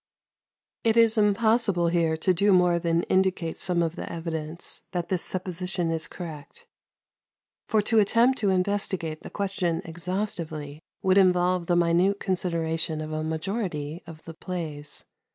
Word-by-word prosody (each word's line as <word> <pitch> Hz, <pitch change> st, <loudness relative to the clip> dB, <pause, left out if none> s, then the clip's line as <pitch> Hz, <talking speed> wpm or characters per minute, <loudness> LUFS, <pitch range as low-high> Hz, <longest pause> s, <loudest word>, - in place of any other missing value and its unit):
122. 230 Hz, -, +2 dB
It 230 Hz, -, +8 dB
is 225 Hz, 0 st, -1 dB
impossible 210 Hz, -4 st, +3 dB
here 165 Hz, -2 st, +1 dB
to 185 Hz, +3 st, +2 dB
do 200 Hz, +4 st, +3 dB
more 180 Hz, -2 st, +4 dB
than 170 Hz, 0 st, +1 dB
indicate 185 Hz, -3 st, 0 dB
some 175 Hz, -2 st, +1 dB
of 165 Hz, 0 st, -2 dB
the -, -, -6 dB
evidence 165 Hz, -1 st, -5 dB
that 175 Hz, -2 st, -2 dB
this 185 Hz, -3 st, +1 dB
supposition 180 Hz, -1 st, -1 dB
is 160 Hz, -1 st, -1 dB
correct, 155 Hz, -5 st, -9 dB, 1.0 s
for 215 Hz, -2 st, +2 dB
to 225 Hz, +1 st, +3 dB
attempt 235 Hz, +5 st, +3 dB
to 205 Hz, -, +1 dB
investigate 185 Hz, -4 st, -1 dB
the -, -, -9 dB
question 190 Hz, -4 st, -1 dB
exhaustively 165 Hz, -4 st, -4 dB, 0.2 s
would 190 Hz, +1 st, +5 dB
involve 180 Hz, -1 st, +3 dB
the 175 Hz, -, +2 dB
minute 175 Hz, +4 st, +3 dB
consideration 165 Hz, -4 st, -1 dB
of 155 Hz, 0 st, -5 dB
a 155 Hz, 0 st, -2 dB
majority 160 Hz, -2 st, -3 dB
of 160 Hz, -1 st, -11 dB
the 165 Hz, -, -8 dB
plays. 155 Hz, -4 st, -6 dB
175 Hz, 150 wpm, -26 LUFS, 165-190 Hz, 1.0 s, It